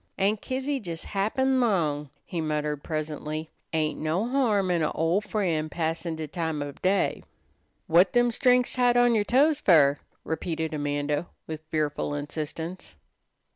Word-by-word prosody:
"Aunt 200 +2 +1
Kizzy 265 +1 -2
jes 165 -3 -6
happen' 260 +7 +1
'long," 155 - +1 0.2
he 170 -3 -3
muttered 150 -1 -2
presently. 155 0 -4 0.2
"Ain't 155 -1 0
no 165 +8 0
harm 220 -8 +2
in 170 -2 +1
a' 155 - +2
ol' 165 +5 +1
frien' 170 -8 -1
passin' 165 +1 -2
de 160 -1 -5
time 160 -2 -2
ob 145 -1 -9
day." 190 +2 +1 0.6
"Whut 175 +3 +5
them 240 0 +4
strings 250 +1 +3
tied 245 -1 +3
on 245 0 +5
yer 215 -2 +3
toes 285 +7 +3
fer?" 145 - +5 0.2
repeated 160 0 -3
Amanda 145 +2 -1 0.2
with 155 -1 -6
fearful 150 -1 -1
insistence. 155 - -5
165 Hz, 145 wpm, -27 LUFS, 155-215 Hz, 0.6 s, Whut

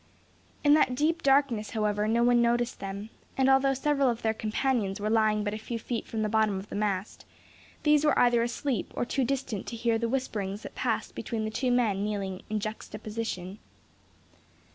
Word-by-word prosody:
In 290 - +6
that 280 -4 +4
deep 320 +4 +1
darkness, 270 -7 +2
however, 210 -1 0
no 230 +2 +2
one 240 0 +4
noticed 240 +1 +1
them; 200 +3 -6 0.3
and 265 0 +3
although 270 0 +4
several 275 0 +2
of 235 -1 -3
their 220 -1 +2
companions 220 -2 -1
were 210 +1 -1
lying 215 -1 +3
but 205 0 -2
a 215 - -4
few 230 +2 -4
feet 230 +1 -4
from 220 -1 -2
the - - +1
bottom 215 -2 +2
of 190 +2 -8
the - - -6
mast, 200 -1 -2 0.6
these 300 -1 +4
were 300 - +3
either 240 -1 +4
asleep 240 -1 -2
or - - 0
too 270 +2 0
distant 255 -5 -2
to 235 - -5
hear 230 0 +1
the 230 0 -1
whisperings 210 -6 -3
that - - -8
passed - - -2
between 225 -2 -3
the 215 - -3
two 255 +3 -1
men 225 -6 +2
kneeling 200 -3 -3
in 215 0 -1
juxtaposition. 215 -2 -5
225 Hz, 190 wpm, -28 LUFS, 210-255 Hz, 0.6 s, In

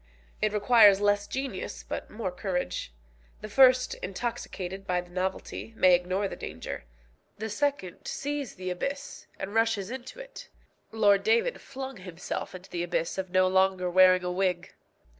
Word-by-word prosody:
It 215 - +2
requires 210 -1 +6
less 205 0 +2
genius, 275 - -4
but - - -5
more 210 -4 -4
courage. 180 - -3 0.5
The 215 - -6
first, 255 +2 +5
intoxicated 195 -2 -5
by 180 -1 +1
the 175 0 -16
novelty, 190 +4 -4
may 185 -1 +6
ignore 185 +3 +1
the - - -6
danger; - - -7 0.5
the 220 +1 -4
second 245 -7 -2
sees 285 -3 -3
the 185 -1 -4
abyss, 275 +10 -5
and 195 +1 -5
rushes 225 -2 +1
into 260 - -7
it. - - -10 0.4
Lord 205 -3 +4
David 465 +2 +2
flung 265 -2 -7
himself 180 -1 -6
into 185 +1 -11
the 175 - -2
abyss 175 +1 -1
of 190 -1 -3
no 185 +1 +4
longer 190 -1 +2
wearing 185 0 +6
a 180 - -1
wig. 180 -1 -1
195 Hz, 155 wpm, -28 LUFS, 185-240 Hz, 0.5 s, requires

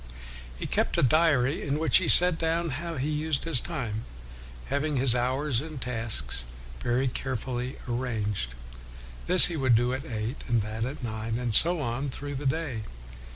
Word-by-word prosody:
He - - -5
kept - - 0
a - - +3
diary 145 -1 +3
in 145 0 -1
which 160 +1 +5
he 185 - 0
set 180 -2 +5
down 165 +1 0
how 165 +4 -4
he 130 +3 -1
used 150 -1 -1
his 165 -7 +1
time; 120 -10 -4 0.6
having 140 +2 -1
his 130 -2 +2
hours 130 +1 +1
and 155 -2 -7
tasks 115 - +1 0.4
very 125 +2 0
carefully 125 0 -3
arranged, 110 - -2 0.7
this 180 +1 +8
he 175 - 0
would 130 -4 +3
do 120 +2 +2
at 130 +1 -4
eight, 115 -2 -5
and 115 -3 +1
that 110 +2 -3
at 130 +1 -6
nine, 110 0 -3
and 120 -2 -2
so 170 +9 +2
on 135 +2 -2
through 145 +2 -6
the 140 +1 -3
day. 140 -5 -2
130 Hz, 170 wpm, -27 LUFS, 120-150 Hz, 0.7 s, this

